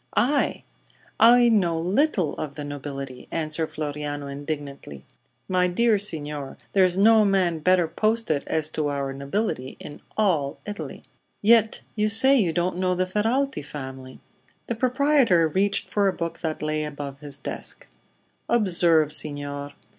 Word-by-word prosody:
"I! 280 +5 +1 0.6
I 240 +1 +7
know 175 -7 +2
little 185 - +1
of 145 -2 -5
the 150 - -6
nobility!" 140 -2 -7
answered 160 0 -1
Floriano, 145 -1 -5
indignantly. 140 - -7 0.4
"My 180 -1 +2
dear 215 +4 +2
signor, 150 -7 -3 0.2
there 195 - +5
is 180 0 +2
no 220 +2 +6
man 185 -5 +1
better 180 +1 +3
posted 215 -6 0
as 155 -2 0
to 155 -1 -2
our 140 -1 -3
nobility 140 - -3
in 145 - -10 0.2
all 165 -10 +1
Italy." 205 0 -7 0.4
"Yet 225 0 +4
you 215 0 +2
say 265 +6 +7
you 200 -10 +2
don't 175 +2 -1
know 185 -1 +1
the 185 +1 0
Ferralti 225 - -1
family." 130 -2 -9 0.5
The - - -2
proprietor 255 - +3
reached 195 +5 0
for 200 -1 +1
a 190 - +1
book 170 -2 -5
that 155 -2 -4
lay 155 0 -1
above 145 -2 -6
his 145 -1 -5
desk. - - -5 0.6
"Observe, 170 -8 +3
signor. 145 -1 -2
170 Hz, 145 wpm, -24 LUFS, 145-210 Hz, 0.6 s, I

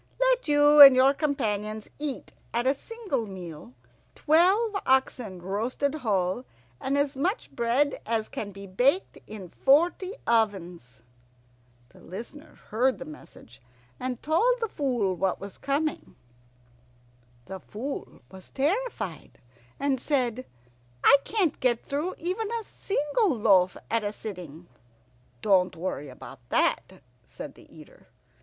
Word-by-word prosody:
Let - - +2
you 290 0 +6
and 275 -2 +12
your 265 +2 +5
companions 215 -8 -2
eat 295 -3 -4 0.2
at 240 +1 +1
a 265 - +4
single 360 - -4
meal 170 -9 -9 0.4
twelve 380 +8 +3
oxen 250 -7 0
roasted 230 +9 -1
whole, 205 -6 -1 0.4
and 275 +1 -1
as 285 0 0
much 360 - -2
bread 245 +5 0
as 220 -1 -1
can 205 - -6
be 200 0 -10
baked 255 - +1
in 210 -4 -8
forty 345 - +2
ovens!'" 175 - -1 0.9
The - - -19
Listener 235 - -10 0.2
heard 250 +4 +2
the - - -8
message, 150 -6 -14 0.4
and 250 -1 -4
told 455 +12 +2
the 455 - -1
Fool 245 - -1
what 190 +1 -1
was 200 0 -9
coming. 285 +2 -2 1.3
The 190 - -7
Fool 250 +10 -7
was 190 -1 -12
terrified, 285 - -2 0.4
and 275 -3 0
said, 255 -4 -1 0.6
"I 280 - +8
can't 385 -9 0
get 240 -2 +1
through 300 +6 -2
even 375 +6 -3
a 465 -1 -2
single 395 +2 -1
loaf 200 - +3
at 230 -1 +1
a 205 - -2
sitting." 180 -6 -9 0.8
"Don't 185 -3 +3
worry 165 -4 -4
about 130 +1 -11
that," - - 0 0.2
said - - -9
the - - -19
Eater. - - -16
255 Hz, 130 wpm, -27 LUFS, 195-295 Hz, 1.3 s, and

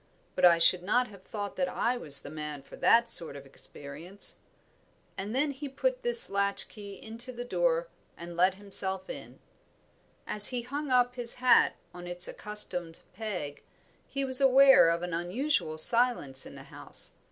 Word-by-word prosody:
But 185 - +2
I 170 -1 +6
should 175 +2 +3
not 245 +7 0
have 200 -3 -15
thought 205 +1 -7
that 180 -1 -1
I 240 +6 -1
was 145 - +4
the 145 - -10
man 150 -2 -7
for - - -14
that 235 0 +3
sort 165 -10 0
of 140 -1 -11
experience." 145 +7 -7 0.8
And 205 +5 -6
then 285 +2 0
he 280 +1 -8
put - - -3
this 480 -1 +1
latch 200 0 -1
key 200 -2 -11
into 230 +3 -8
the 245 0 -8
door, - - -1 0.3
and 170 0 -10
let 185 +2 +2
himself 190 -1 +1
in. - - -11 0.9
As 210 -1 +7
he 245 -2 -2
hung 285 +4 -6
up 245 -1 +2
his 240 -1 -2
hat 255 0 +3 0.2
on 175 0 -10
its 175 0 +4
accustomed 180 -6 -3
peg, 180 -9 -6 0.5
he 275 0 -4
was 260 +1 +5
aware 270 -7 +6
of 170 +1 -2
an 175 -1 -5
unusual 175 - -2
silence 230 - +2
in - - -13
the - - -12
house. - - -11
205 Hz, 175 wpm, -28 LUFS, 175-250 Hz, 0.9 s, As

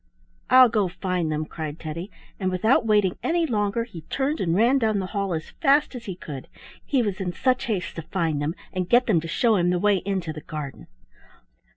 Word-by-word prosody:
"I'll 255 0 +8
go 215 -4 +1
find 180 -2 -2
them," 155 0 -1
cried 155 -1 -6
Teddy, 165 +4 -6 0.3
and 190 -2 0
without 220 +6 +2
waiting 205 -4 +2
any 335 0 +1
longer 215 -3 0
he 210 -8 -10
turned 280 +3 -1
and 170 -2 +1
ran 240 +7 +4
down 220 -3 +1
the 190 - -1
hall 200 -2 -1
as 160 - -6
fast 280 +1 +4
as 240 -2 -8
he 190 -4 -5
could, 140 -7 -8 0.4
he 265 -4 +1
was 200 -2 -2
in 180 -2 -2
such 255 +6 +1
haste 200 -7 -3
to - - -2
find 160 -3 -1
them 155 +4 -2 0.2
and 185 -1 -2
get 245 +1 +5
them 185 -8 +2
to 165 - -6
show 225 +5 +2
him 175 -1 +2
the 180 - +2
way 205 +2 +3
into 185 -4 -3
the 155 - -8
garden. 150 -3 -7
190 Hz, 215 wpm, -24 LUFS, 165-230 Hz, 0.4 s, I'll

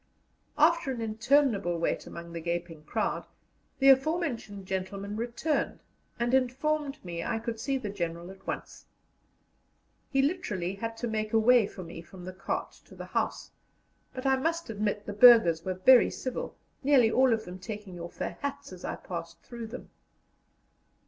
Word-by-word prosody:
After 325 -1 +4
an 250 - -4
interminable 225 - +2
wait 170 - -1
among 170 0 -9
the 165 - -5
gaping 170 -1 -3
crowd, - - -2 0.5
the 270 0 +5
aforementioned 265 - +2
gentleman 195 +2 -4
returned, 245 +6 -2 0.4
and 240 +1 0
informed 275 +1 0
me 170 -1 -4
I - - -1
could 225 0 -4
see 275 +3 0
the 215 -6 -4
General 170 -2 -4
at 195 0 -16
once. - - -6 1.2
He 270 -1 +2
literally 210 - -1
had 225 +3 -5
to 240 - -3
make 215 -1 -2
a 225 - +5
way 235 -1 +5
for 185 - -9
me 165 0 -8
from 180 +1 -12
the 185 - -6
cart 190 +1 -3
to - - -15
the - - -7
house, - - -2 0.6
but 255 +1 -7
I 265 0 +4
must 330 0 -1
admit 210 -1 -2
the 205 - -5
burghers 205 -8 +7
were 185 -1 -2
very 240 +7 +6
civil, 255 -1 -5 0.3
nearly 260 -5 +5
all 260 +1 +4
of 220 -1 0
them 180 +1 -8
taking 200 -2 -7
off 170 0 -8
their - - -4
hats 280 -1 -4
as - - -11
I - - -3
passed - - -7
through 235 -2 -7
them. 245 +3 -9
225 Hz, 170 wpm, -29 LUFS, 185-265 Hz, 1.2 s, burghers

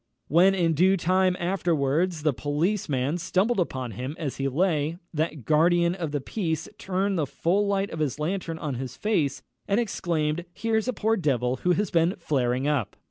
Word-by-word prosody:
When, 180 +6 +5
in 170 -3 +2
due 185 +5 +4
time 185 +1 +2
afterwards, 170 -2 0
the 150 -2 +2
policeman 150 - -1
stumbled 190 +6 +1
upon 130 -8 -2
him 130 +8 -5
as 150 -5 -4
he 135 - -1
lay, 155 +1 0 0.2
that 155 -4 -2
guardian 170 +2 +3
of 170 -5 -4
the 145 - -1
peace 160 +1 -3
turned 190 0 -1
the 150 - 0
full 195 +9 +1
light 200 0 0
of 160 - -5
his 145 -4 -1
lantern 165 +1 -2
on 150 -3 -3
his 125 0 -6
face, 160 -11 0 0.2
and 200 +3 +2
exclaimed, 170 -7 -1
"Here's 225 0 0
a 255 - 0
poor 225 0 +1
devil 130 -6 0
who 180 - +2
has 205 +1 -1
been 170 +2 +2
flaring 130 -5 0
up!" 145 -8 0
165 Hz, 180 wpm, -26 LUFS, 145-190 Hz, 0.2 s, When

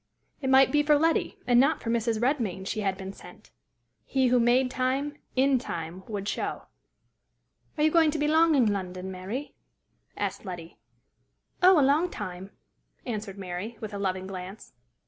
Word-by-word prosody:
It 265 - -1
might 265 0 +6
be 295 - +4
for 295 0 +4
Letty, 325 +2 +1
and 245 -1 +4
not 275 +4 +3
for 230 - -1
Mrs. 230 -1 0
Redmain, 230 -8 -1
she 215 - -3
had 195 -2 -1
been 190 0 -7
sent. - - -15 0.5
He 260 -2 +1
who 250 0 +4
made 250 +2 +3
time 270 +3 -1 0.2
in 265 0 +3
time 170 -5 -6
would 205 -2 -4
show. - - -3 1.1
"Are 300 - +1
you 310 - +4
going 325 -1 +5
to 310 - -2
be 295 0 +1
long 320 +1 +4
in 230 -7 +3
London, 185 -1 -5
Mary?" 195 +10 -6 0.6
asked 200 -1 -3
Letty. 175 -4 -8 0.8
"Oh, 365 -2 +7
a 275 - +4
long 305 +6 +3
time!" 190 - -7 0.6
answered 210 -4 -5
Mary, 195 +4 -6
with 215 -1 -7
a 200 - -4
loving 190 -1 -2
glance. 190 0 -8
230 Hz, 170 wpm, -27 LUFS, 190-275 Hz, 1.1 s, Oh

